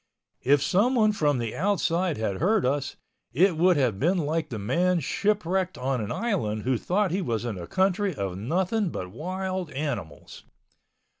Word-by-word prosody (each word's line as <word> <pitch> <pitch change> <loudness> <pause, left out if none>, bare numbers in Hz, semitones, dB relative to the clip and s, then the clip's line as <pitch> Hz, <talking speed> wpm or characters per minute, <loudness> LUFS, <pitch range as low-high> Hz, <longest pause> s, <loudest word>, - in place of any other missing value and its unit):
If 140 +1 +3
someone 215 - +3
from 150 -9 +1
the 115 -2 -3
outside 180 -2 0
had 105 -3 -2
heard 200 - +2
us, 140 +2 -1 0.4
it 180 +5 +4
would 175 +1 +4
have 120 -8 +1
been 175 +6 +2
like 155 -1 -1
the 115 - -4
man 170 - +1
shipwrecked 190 +2 0
on 130 -1 -1
an 105 - -4
island 135 - -1
who 130 +1 +1
thought 195 0 0
he 190 +3 0
was 120 - -2
in 115 -4 -3
a 85 - -7
country 190 +1 +1
of 95 -2 -3
nothing 185 - 0
but 90 - -6
wild 185 - -4
animals. 125 - -5
165 Hz, 165 wpm, -26 LUFS, 125-190 Hz, 0.4 s, it